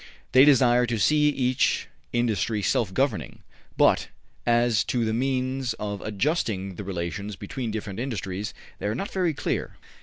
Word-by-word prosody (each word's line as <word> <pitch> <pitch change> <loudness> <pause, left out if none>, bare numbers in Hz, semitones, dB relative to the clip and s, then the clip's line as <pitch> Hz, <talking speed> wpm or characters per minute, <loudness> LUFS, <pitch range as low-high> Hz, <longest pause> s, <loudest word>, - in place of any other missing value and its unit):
They 130 +2 +7
desire 125 -4 +5
to 115 -1 -1
see 150 +7 +4
each 130 -3 +1 0.2
industry 110 -3 0
self 105 -2 +1
governing, 110 - -1 0.3
but - - +4 0.4
as 120 -1 +3
to 120 -2 0
the 110 - 0
means 130 +1 -1
of 100 -1 -5
adjusting 105 - -1
the 105 - -7
relations 95 +2 -4
between 115 +5 -5
different 105 -2 -5
industries, 105 -5 -3 0.3
they - - -2
are 105 - -1
not 195 +10 -4
very 180 -5 0
clear. - - -2
115 Hz, 150 wpm, -26 LUFS, 100-130 Hz, 0.4 s, They